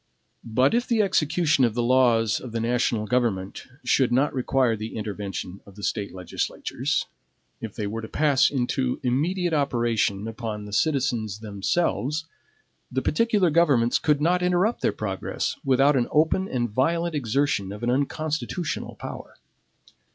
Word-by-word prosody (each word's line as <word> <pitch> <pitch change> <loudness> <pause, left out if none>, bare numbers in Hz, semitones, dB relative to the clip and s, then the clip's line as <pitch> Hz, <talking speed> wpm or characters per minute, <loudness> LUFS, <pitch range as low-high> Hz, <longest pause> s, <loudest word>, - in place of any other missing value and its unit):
But 125 +4 +2
if 240 +1 +1
the 230 -3 +3
execution 160 -5 +2
of 115 -3 +2
the 120 - 0
laws 120 -4 +3
of 120 -3 -9
the 115 - -1
national 115 -1 0
government 110 -6 -1 0.2
should 130 -3 +2
not 135 +4 +2
require 130 -2 +1
the 110 +1 -6
intervention 100 -3 -5
of 100 - -16
the 105 - -11
State 100 +2 -2
legislatures, 90 -2 -2 0.6
if 110 -3 -6
they 105 - -3
were 110 +3 -4
to 110 - -7
pass 145 -1 +3
into 130 -1 -1
immediate 165 +8 0
operation 115 -7 0
upon 110 -2 -5
the 105 - -9
citizens 120 -7 0
themselves, 135 - -1 0.7
the 130 +1 -1
particular 205 -1 +2
governments 140 -8 +3
could 150 -2 +2
not 180 +3 +2
interrupt 180 +5 +1
their - - +2
progress - - -3
without 135 +1 +4
an 125 -2 +1
open 160 +5 +2
and 120 -3 -1
violent 165 +8 +1
exertion 130 -7 0
of 105 +3 -8
an 120 - +1
unconstitutional 155 +4 -2
power. - - -8
125 Hz, 150 wpm, -25 LUFS, 110-155 Hz, 0.7 s, without